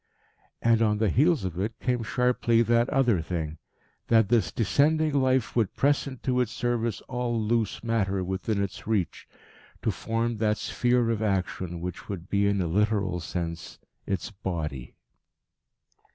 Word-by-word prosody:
And 115 -1 +4
on 105 -2 +3
the 105 -3 +1
heels 150 - +3
of 90 -2 -4
it 110 +4 -3
came 125 -2 0
sharply 120 0 +2
that 120 +2 +2
other 125 - +2
thing: 80 -1 -4 0.5
that 115 -3 +4
this 120 -2 +2
descending 150 +8 +2
Life 130 -3 +1
would 115 -5 +1
press 145 +1 +2
into 130 -1 -1
its 120 -3 -1
service 120 -3 -1
all 125 -2 -2
loose 110 +1 0
matter 100 -5 0
within 95 +3 -1
its 100 +1 -6
reach 105 -6 -1 0.6
to - - +2
form 115 0 -2
that 105 0 +1
sphere 120 -1 +1
of 110 -2 -1
action 95 -4 -2
which 90 0 -6
would 95 -3 -6
be 100 0 +3
in 100 -1 +1
a - - 0
literal 100 0 +1
sense 85 -6 -5 0.3
its 95 0 -2
Body. 80 - -5
110 Hz, 150 wpm, -27 LUFS, 95-120 Hz, 0.6 s, And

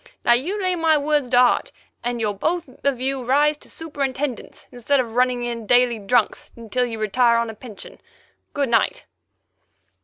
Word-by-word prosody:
Now 240 - +6
you 335 +13 0
lay 370 -2 +1
my 325 -2 +3
words 295 -3 0
to 245 - +3
heart, 250 0 +3 0.3
and 240 0 -2
you'll 215 -2 0
both 330 - -2 0.2
of 280 -3 +1
you 265 0 -2
rise 290 +4 +3
to - - -15
superintendents, 280 -4 -4
instead 250 +3 0
of 235 -3 -2
running 250 0 +1
in 235 -2 -5
daily 245 -1 +3
'drunks' 215 +2 0
until 235 +2 -2
you 225 -2 -6
retire 235 +3 +2
on 230 -1 -1
a - - -11
pension. 215 -1 -11 0.6
Good 280 -3 0
night." 230 -1 +1
250 Hz, 175 wpm, -22 LUFS, 235-285 Hz, 0.6 s, Now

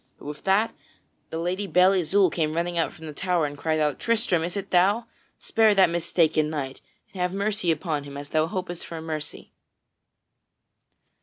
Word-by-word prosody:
But - - -15
with 150 0 -7
that 200 +4 +3 0.6
the 160 - -4
Lady 180 +4 -2
Belle 185 +1 +5
Isoult 190 0 +3
came 155 -2 0
running 170 +1 -1
from 170 -1 +2
out - - -11
the 160 -1 -8
tower 180 0 0
and 145 0 -4
cried 155 +2 -1
out: 150 -2 0
"Tristram, 225 -8 +1
is 175 +4 -3
it 200 0 -5
thou? 200 +6 +3 0.3
Spare 220 -2 +3
that 190 -3 +5
mistaken 165 -2 +2
knight 135 -4 -4 0.3
and 185 - -5
have 180 0 0
mercy 200 -2 -1
upon 155 -3 -1
him 140 0 -8
as 145 0 -8
thou 155 0 +2
hopest 180 -1 -4
for 165 - -7
mercy." 155 -1 -6
170 Hz, 180 wpm, -25 LUFS, 155-190 Hz, 0.6 s, Belle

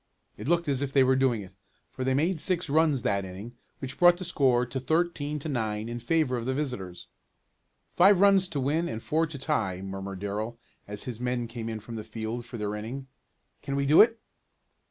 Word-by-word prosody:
It - - -8
looked 170 0 +2
as 140 -2 +1
if 140 -1 -2
they 135 -1 +5
were 130 0 +4
doing 130 -5 +1
it, 95 0 -13 0.4
for 130 - -5
they 130 0 +1
made 160 +4 +1
six 170 -3 0
runs 155 -4 +3
that 100 -1 +1
inning, 95 +6 -8 0.2
which 135 -1 -7
brought 175 0 +7
the 185 - -5
score 130 -7 +2
to 125 +2 -4
thirteen 150 +1 0
to 150 - -6
nine 110 -5 -2
in 120 +1 -4
favor 150 -1 +1
of 120 +1 -4
the 130 - 0
visitors. 115 -12 -4 0.9
"Five 190 +1 +6
runs 195 -1 +5
to 145 - -3
win, 155 +6 0
and 110 0 -5
four 160 +2 +1
to 150 -2 -7
tie," 115 - -1
murmured 95 0 -6
Darrell 105 +4 -4 0.3
as 105 0 -5
his 125 -3 -6
men 125 -1 -1
came 115 -1 -6
in 110 -1 -4
from 115 +2 -8
the 110 - -5
field 110 +2 -5
for 120 - -7
their 105 -1 -2
inning. 125 +6 -6 0.5
"Can 140 - -3
we 140 0 0
do 150 +3 +7
it?" 225 +1 +4
130 Hz, 215 wpm, -28 LUFS, 110-155 Hz, 0.9 s, brought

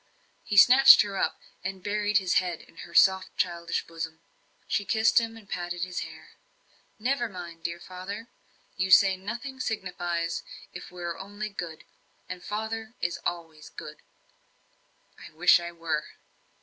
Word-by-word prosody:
He 210 -3 -2
snatched 255 +5 +9
her 200 -1 -6
up, - - 0 0.3
and 190 0 -5
buried 210 0 +1
his 190 -3 +3
head 175 -3 -4
in - - -20
her 170 - -10
soft, 190 -1 +4
childish 170 -1 -1
bosom. 165 -1 -6 0.5
She 205 - 0
kissed 220 +4 +4
him 225 0 -5
and 215 -3 -15
patted 175 -1 -4
his 180 -1 -3
hair. - - -9 0.7
"Never 240 +1 0
mind, 170 -3 -9
dear 170 +1 -4
father. 185 +6 -7 0.5
You 190 0 -1
say 195 0 +7
nothing 235 +8 -6
signifies, 175 -7 -2 0.3
if - - -8
we 180 -1 -9
are 170 -1 -4
only 205 +2 -6
good. 170 -6 -7 0.4
And 180 -1 -7
father 220 +2 -4
is 175 -1 -2
always 165 -3 -5
good." - - -9 1.2
"I - - -11
wish 175 +3 +6
I 170 0 -6
were." 165 -3 -2
185 Hz, 150 wpm, -27 LUFS, 170-210 Hz, 1.2 s, snatched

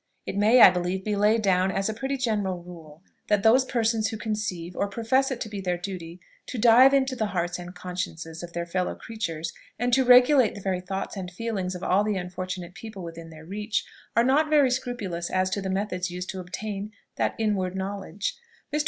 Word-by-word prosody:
It - - -4
may, 220 +5 +5
I - - +11
believe, 180 +1 -2
be 210 -1 0
laid 215 +2 +3
down 190 -1 +3
as 195 +1 -1
a 220 - -1
pretty 270 +5 -3
general 205 -8 -1
rule, 165 -2 -12 0.2
that 205 -2 +2
those 245 +4 +6
persons 225 -3 +1
who 220 - -4
conceive, 205 -6 -3
or 200 - 0
profess 235 +6 +1
it 260 -3 -3
to - - -2
be 205 -2 -6
their 180 -2 -1
duty, 175 -2 -7 0.3
to 255 - -5
dive 240 +4 +7
into 265 -1 +2
the 220 -3 -1
hearts 175 -2 -2
and 175 +1 -9
consciences 175 -3 -5
of 175 -1 -8
their 170 0 -2
fellow 180 +1 -2
creatures, 170 -7 -5 0.2
and 245 +1 0
to 265 +2 +5
regulate 250 0 +6
the - - -7
very 185 -1 -1
thoughts 190 +3 -4
and 185 -2 -5
feelings 190 -1 -3
of 180 - -7
all 195 +3 +3
the 210 -1 0
unfortunate 180 0 -5
people 215 -2 -9
within 165 -1 -8
their 160 -1 -12
reach, 210 +4 -2 0.3
are 235 - +5
not 290 +5 +3
very 290 -4 +4
scrupulous 210 -9 -3
as 185 0 +1
to 200 - -1
the 190 - -3
methods 190 -1 -2
used 180 +1 -6
to 190 - -6
obtain 200 +3 -5 0.3
that - - 0
inward 195 -4 0
knowledge. 195 +1 -3 0.4
Mr. 300 - +2
195 Hz, 210 wpm, -26 LUFS, 180-225 Hz, 0.4 s, I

